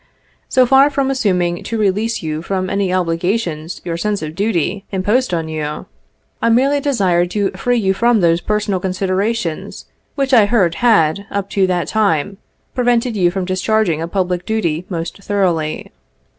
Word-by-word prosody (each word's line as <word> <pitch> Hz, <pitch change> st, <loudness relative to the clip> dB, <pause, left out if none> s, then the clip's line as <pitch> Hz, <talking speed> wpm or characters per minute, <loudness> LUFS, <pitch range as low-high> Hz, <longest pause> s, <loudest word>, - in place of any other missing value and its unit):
So 255 Hz, -1 st, +4 dB
far 270 Hz, +3 st, +5 dB
from 275 Hz, -1 st, 0 dB
assuming 180 Hz, -9 st, 0 dB
to 230 Hz, -, -3 dB
release 210 Hz, +1 st, 0 dB
you 155 Hz, 0 st, -3 dB
from 185 Hz, +1 st, -2 dB
any 195 Hz, -2 st, 0 dB
obligations 175 Hz, -1 st, -1 dB
your 170 Hz, -1 st, -3 dB
sense 205 Hz, 0 st, -2 dB
of 155 Hz, 0 st, -5 dB
duty 195 Hz, 0 st, -1 dB
imposed 205 Hz, +5 st, +1 dB
on 165 Hz, -2 st, -1 dB
you, 150 Hz, -1 st, -4 dB, 0.6 s
I -, -, +2 dB
merely 270 Hz, +5 st, +3 dB
desired 190 Hz, -11 st, +1 dB
to 200 Hz, +1 st, -1 dB
free 245 Hz, +6 st, 0 dB
you 195 Hz, -4 st, +1 dB
from 235 Hz, +3 st, +2 dB
those 170 Hz, -1 st, +2 dB
personal 210 Hz, -2 st, -1 dB
considerations 190 Hz, 0 st, -2 dB, 0.3 s
which 275 Hz, -2 st, -1 dB
I 220 Hz, -5 st, +6 dB
heard 195 Hz, -7 st, +2 dB
had, 200 Hz, -4 st, +3 dB
up 200 Hz, -1 st, -3 dB
to 195 Hz, -2 st, +2 dB
that 180 Hz, -2 st, -1 dB
time, 200 Hz, -3 st, 0 dB, 0.4 s
prevented 245 Hz, -1 st, +1 dB
you 180 Hz, -4 st, +3 dB
from 185 Hz, +1 st, -3 dB
discharging 185 Hz, -2 st, 0 dB
a 165 Hz, -, -2 dB
public 180 Hz, -1 st, -1 dB
duty 180 Hz, -6 st, -2 dB
most 170 Hz, 0 st, -5 dB
thoroughly. 180 Hz, -7 st, -1 dB
195 Hz, 160 wpm, -17 LUFS, 175-220 Hz, 0.6 s, I